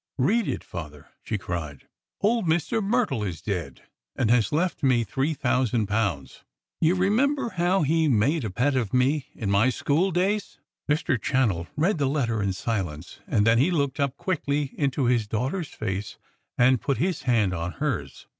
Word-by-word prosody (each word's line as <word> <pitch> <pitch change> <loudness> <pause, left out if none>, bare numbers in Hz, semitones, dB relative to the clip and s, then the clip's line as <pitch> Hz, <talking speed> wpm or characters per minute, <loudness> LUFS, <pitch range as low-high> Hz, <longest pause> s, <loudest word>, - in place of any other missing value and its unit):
"Read 210 - +2
it, - - -3
father," 75 -4 -9
she 110 - -3
cried. 80 -7 -6 0.3
"Old 220 -2 +2
Mr. 170 +8 +1
Myrtle 205 - +1
is 90 -6 -4
dead, 85 - -4 0.3
and 110 - +1
has 115 -4 +3
left 170 +4 0
me 125 -4 +3
three 135 +7 -1
thousand 120 -4 +1
pounds! 100 -9 -2 0.4
You 165 +3 +3
remember 235 +9 +1
how 180 -1 +1
he 160 +2 +2
made 135 +5 +2
a 110 - -2
pet 130 +9 0
of 120 -3 -1
me 135 +3 +2
in 100 -3 -2
my 100 +5 +4
school 150 +8 +1
days?" 195 +4 -1 0.3
Mr. 150 -4 +1
Channell 105 -11 +1
read 170 +3 +1
the 140 - +2
letter 120 -7 0
in 100 -1 0
silence; 90 -6 -4
and 105 -2 +2
then 115 +1 +4
he 140 +8 +4
looked 140 -6 -1
up 140 -1 0
quickly 145 -6 -1
into 140 -2 0
his 120 -3 +2
daughter's 135 - -2
face, 100 -1 -4 0.4
and 125 0 +4
put 140 - 0
his 180 -1 -1
hand 105 -6 +3
on 85 +1 -3
hers. - - -3
130 Hz, 175 wpm, -25 LUFS, 105-160 Hz, 0.4 s, my